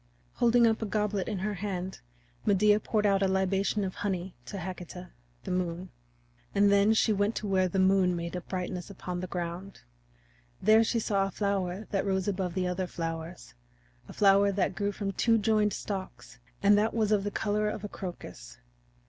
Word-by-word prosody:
Holding 240 -1 +4
up 225 0 +2
a 220 - -2
goblet 210 -1 -1
in 210 - -2
her 210 +3 -2
hand 190 -1 -4 0.4
Medea 210 +1 +4
poured 215 -1 0
out 200 -1 +3
a 195 - +3
libation 190 +2 +1
of 185 -1 -3
honey 185 -2 -3
to 200 - -6
Hecate, 180 0 -7 0.4
the - - -5
Moon. 180 0 -2 0.7
And 200 0 +5
then 200 +2 +4
she 220 0 +3
went 205 +2 0
to - - -3
where 190 -2 +2
the 185 - -3
moon 190 -1 +3
made 170 +1 -4
a 180 - -3
brightness 180 0 -5
upon 180 -2 -5
the 185 - -4
ground. 175 +2 -5 0.8
There 215 +3 +5
she 230 - 0
saw 200 -3 +1
a - - -5
flower 195 0 -2
that 195 - +1
rose 190 -1 -1
above 185 -3 -2
the 185 -1 0
other 180 +1 -2
flowers 165 - -6 0.6
a - - -8
flower 200 0 +4
that 190 -1 0
grew 200 +2 -1
from 200 0 -3
two 225 +4 +2
joined 210 -1 +2
stalks, 195 -2 -6 0.2
and 205 +1 +6
that 220 +2 0
was 215 -2 +1
of 205 -2 +3
the 205 - -1
color 210 0 0
of 210 - -5
a - - -3
crocus. 170 - -8
195 Hz, 190 wpm, -29 LUFS, 180-210 Hz, 0.8 s, and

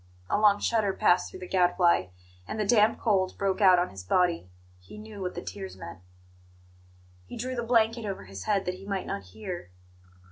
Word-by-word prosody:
A - - +2
long 205 -1 +5
shudder 215 -4 +1
passed 180 -1 +2
through 185 - -11
the 180 - -6
Gadfly, 175 - +3 0.4
and 220 - -5
the 210 - +1
damp 215 +1 +4
cold 190 -5 +1
broke 195 0 -1
out 185 -2 +7
on 175 - 0
his 95 -1 -9
body. 170 - +1 0.3
He 90 - -13
knew 215 -1 -10
what 180 -1 -4
the - - -5
tears 95 0 -7
meant. 85 -2 -9 1.3
He - - -8
drew 255 +3 -3
the 240 - -2
blanket 230 0 +2
over 200 - -5
his 95 0 -9
head 195 -2 +1
that 180 - -1
he 190 +2 -11
might 195 -2 -2
not 100 - -4
hear. 175 - -7
190 Hz, 200 wpm, -28 LUFS, 175-215 Hz, 1.3 s, out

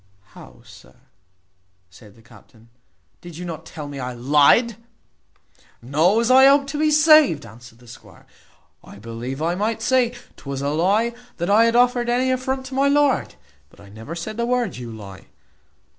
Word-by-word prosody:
"How, - - -16
sir," - - -17 1.0
said 100 +3 -18
the 115 - -21
captain, 115 0 -21 0.5
"did 175 -2 -11
you 180 - -7
not 160 -2 -8
tell 150 -2 -9
me 140 -1 -8
I 125 -1 -5
lyed?" 145 - +3 1.0
"No, 155 - +1
as 235 +2 +1
I 265 +1 +7
hope 280 0 +4
to 295 - -5
be 310 0 +2
saved," 305 - +4
answered 115 +2 -15
the 120 0 -20
squire, 115 - -16 0.3
" - - -40
I - - -14
believe 115 +6 -7
I 170 +1 0
might 220 +4 -3
say, 250 -1 +1 0.2
'Twas 140 -1 -6
a 140 - -1
lie 200 +10 0 0.2
that 175 +3 -2
I 220 +3 +5
had 230 0 +1
offered 245 0 +2
any 255 +2 +1
affront 260 +1 -3
to 260 - -10
my 275 +1 +1
lord 285 -1 +1 0.3
but - - -23
I 100 0 -16
never 110 +10 -9
said 215 +6 -7
the 235 0 -2
word, 250 -1 -1
`you 120 -2 -9
lie.' 95 -3 -12
175 Hz, 180 wpm, -21 LUFS, -, 1.0 s, I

